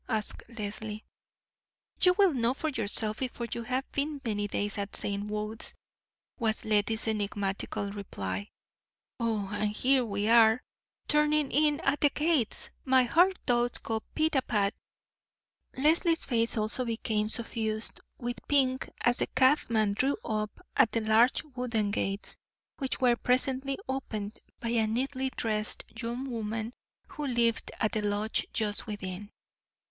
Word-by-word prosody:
asked 220 -3 -1 0.2
Leslie. 215 +1 -5 1.0
"You 360 -1 +6
will 395 -5 +5
know 245 0 +1
for 315 - -2
yourself 215 -4 +1
before 250 -2 -3
you 235 - -3
have 255 +4 -2
been 290 +1 -2
many 205 -2 -1
days 205 0 -1
at 200 0 -3
St. 200 0 -1
Wode's," 210 +1 -5 0.6
was 220 -2 +1
Lettie's 215 +1 +2
enigmatical 200 -1 -2
reply. 100 - -5 0.7
"Oh, 220 -4 0
and 210 0 0
here 255 +5 +3
we 205 -2 -2
are, 225 +1 +6 0.4
turning 300 -1 +2
in 295 0 +3
at 290 -2 +1
the 290 - +5
gates! 300 -6 0
My 260 -1 +5
heart 355 +9 +4
does 240 0 +2
go 225 -1 -3 0.2
pit 315 0 +1
a 270 - +3
pat." 205 -5 0 1.0
Leslie's 325 +4 +3
face 230 -2 +1
also 215 +4 +1
became 220 -2 -1
suffused 220 -1 -3 0.2
with 245 0 -4
pink 260 -2 +2
as 240 +1 +5
the - - +1
cabman 235 -6 +3
drew 270 +7 +1
up 215 -1 -3
at 225 - +4
the 230 - +1
large 220 +3 +4
wooden 230 -5 0
gates, 195 0 -2 0.4
which 270 -2 -1
were 245 -2 +4
presently 260 +2 0
opened 220 -5 -4 0.2
by 230 - -3
a 230 -2 +2
neatly 260 +4 -1
dressed 215 -4 -1
young 235 +3 -4
woman 225 -1 -3 0.3
who 320 -7 -5
lived 235 -2 +1
at 215 - +1
the 215 - 0
lodge 205 +1 0
just 210 +1 -1
within. 205 -1 -6
230 Hz, 140 wpm, -29 LUFS, 210-260 Hz, 1.0 s, You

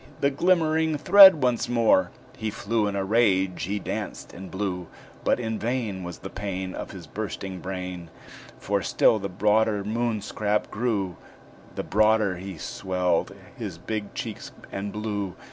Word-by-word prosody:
The 140 - +2
glimmering 160 -1 +2
thread 190 -2 +8
once 125 -1 +1
more! 115 -6 +3 0.3
He 110 - -3
flew 105 +1 -1
in 100 - -2
a 100 -1 -1
rage 95 -4 +2
he 100 +3 -2
danced - - -5
and 95 +1 -9
blew; 95 -3 -3 0.4
But - - +2
in 110 -2 -3
vain 115 -6 -2
Was 90 -1 -6
the - - -8
pain 95 -2 -4
Of - - -6
his 90 -4 -9
bursting 95 0 -5
brain; 90 -1 -6 0.5
For - - -1
still 110 - +3
the 100 0 -4
broader 105 +2 +2
the 105 - -5
Moon 115 -1 0
scrap 105 +1 -1
grew, 105 -6 -1 0.6
The - - -3
broader 110 -2 +3
he 95 -1 -7
swelled 90 +4 -1 0.2
his 105 -9 -6
big 105 +3 -5
cheeks - - -6 0.2
and 100 +1 -4
blew. 105 -3 -3
105 Hz, 160 wpm, -26 LUFS, 95-115 Hz, 0.6 s, thread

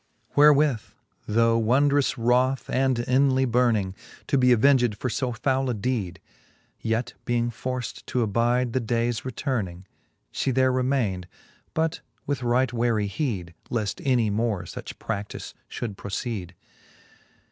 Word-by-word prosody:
XXXI. - - -27
wherewith 145 -4 +5 0.5
though 115 +1 +3
wondrous 140 +5 +2
wroth, 125 +3 +2
and 130 -1 +2
inly 130 +1 +3
burning, 115 -6 +2 0.4
To 140 - +3
be 125 -1 +5
avenged 120 -2 +4
for 130 - -2
(o 125 - 0
fowle 130 +2 0
a 120 - 0
deede. 105 -5 -2 0.6
Yet 115 +2 -1
being 120 0 0
forft 125 +1 -5
to 125 - 0
abide 120 +3 +1
the 130 - +2
daies 115 0 -1
returning, 110 - -3 0.5
She - - -1
there 130 0 +3
remain'd, 125 -9 0 0.5
but 160 0 0 0.2
with 140 -3 -2
right 120 +1 +1
wary 115 -3 +1
heede, 100 - -3 0.2
Leaft 110 -4 -2
any 120 -6 +2
moie 105 -3 0
fuch 85 - -8
praftife 105 -2 -5 0.2
Ihould 110 -4 -5
proceede. 100 -3 -4
120 Hz, 135 wpm, -25 LUFS, 110-130 Hz, 0.6 s, wherewith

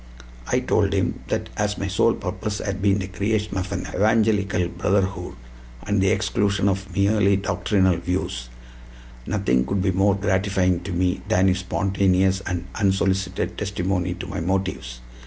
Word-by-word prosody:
I - - +1
told - - +1
him - - 0
that - - -2
as - - 0
my - - -2
sole - - +2
purpose 105 -1 -4
had 100 -1 -4
been 100 -1 +3
the 95 -2 -3
creation 105 +2 -1
of 95 +1 -3
an 95 - -2
evangelical 105 -3 +1
brotherhood 95 +2 -1 0.5
and 100 -1 +1
the 95 - +3
exclusion 100 +1 +1
of 95 -1 -2
merely 100 0 +3
doctrinal 95 -2 +1
views, 85 -9 -3 0.8
nothing 65 0 +1
could 95 +6 -1
be 95 - +2
more 95 +2 +3
gratifying 95 -2 +1
to 100 - -4
me 90 +1 0
than 95 +1 +3
his 90 0 +1
spontaneous 95 0 +1
and 90 -2 -2
unsolicited 95 -2 0
testimony 95 -3 -1
to 90 - -7
my 100 +1 -4
motives. 90 -9 -2
95 Hz, 155 wpm, -23 LUFS, 90-100 Hz, 0.8 s, been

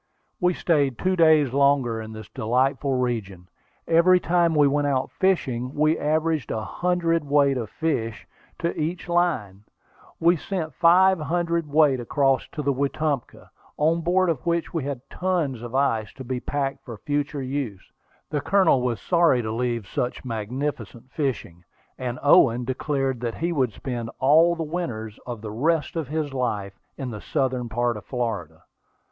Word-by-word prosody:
We 180 -1 +2
stayed 140 -7 +1
two 185 0 0
days 155 -6 +4
longer 140 -5 +2
in 110 0 -8
this 110 -1 -9
delightful 130 +5 0
region. 100 -8 -3 0.4
Every 175 +2 +5
time 170 -2 +2
we 145 -1 +5
went 145 +1 +1
out 135 -2 0
fishing 130 -10 0
we 155 +2 +3
averaged 155 -3 0
a 110 - -2
hundred 165 - 0
weight 140 -1 +3
of 115 -4 -4
fish 115 -7 -2 0.3
to 170 - -2
each 165 +4 -3
line. 150 - 0 0.6
We 170 +1 +4
sent 165 -1 -4
five 185 +2 +5
hundred 170 +1 -1
weight 145 -3 +3
across 135 +1 +1
to 150 - -4
the 140 0 +1
Wetumpka, 140 0 -2 0.3
on 165 +3 +2
board 180 +1 +2
of 140 -6 -5
which 170 -1 -1
we 160 -5 -2
had 135 -3 -5
tons 170 -10 -1
of 120 +1 -7
ice, 115 -6 +1
to 130 - -9
be 130 0 -3
packed 140 +1 -3
for 115 -4 -8
future 145 +3 -2
use. 130 -7 -4 0.4
The 150 -2 -1
Colonel 185 -9 +3
was 125 -2 -1
sorry 170 -8 +3
to 110 - -3
leave 120 -1 -2
such 125 +5 -3
magnificent 120 +1 -4
fishing, 120 - -3 0.4
and 125 -1 -3
Owen 125 -4 +5
declared 135 0 -1
that 115 -1 -3
he 170 +1 -1
would 130 -7 +1
spend 120 +1 -5
all 160 +6 +5
the 165 - -3
winters 120 -10 -4
of 120 -3 -5
the 110 -1 -6
rest 150 +7 0
of 160 -4 -2
his 150 -1 -3
life 105 -7 -2 0.2
in 130 -3 -4
the 105 -2 -7
southern 130 -4 -1
part 120 +1 0
of 105 - -11
Florida. 105 - -4
140 Hz, 165 wpm, -24 LUFS, 120-160 Hz, 0.6 s, Every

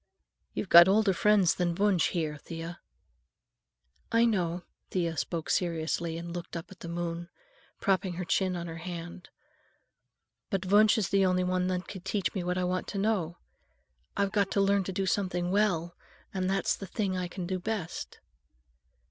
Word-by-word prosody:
"You've - - -2
got 170 +1 +10
older 200 0 +4
friends 200 -1 +4
than 175 -2 -1
Wunsch 195 -3 +3
here, 155 -4 -2
Thea." 165 +3 -7 1.3
"I 230 +1 +5
know." 180 -6 0 0.3
Thea 170 -3 -1
spoke 165 +1 -3
seriously 165 -1 -1
and 170 0 -6
looked 175 -1 -5
up 165 +4 -8
at 190 - -13
the - - -8
moon, 170 0 -4 0.5
propping 190 -3 +1
her 180 +1 -4
chin 185 0 +1
on 170 -1 -4
her 165 -1 -6
hand. 175 +1 -7 1.2
"But 195 -3 -1
Wunsch 210 +3 +5
is 210 -5 0
the 195 -1 +3
only 185 -1 +2
one 180 0 0
that 185 0 -2
can 190 - -7
teach 195 +1 -1
me 190 - -2
what 180 +1 -1
I 185 - 0
want 180 0 -1
to 200 - -5
know. 195 -5 0 0.8
I've 200 -1 +1
got 200 -2 +1
to - - +2
learn 200 0 +3
to 190 - -3
do 195 +1 -1
something 180 -2 0
well, 175 -4 +1 0.4
and 185 -1 -1
that's 195 0 +1
the 195 - -8
thing 195 0 -1
I 180 -1 -2
can 180 0 -6
do 185 +1 -2
best." 200 -4 -4
180 Hz, 175 wpm, -29 LUFS, 170-195 Hz, 1.3 s, got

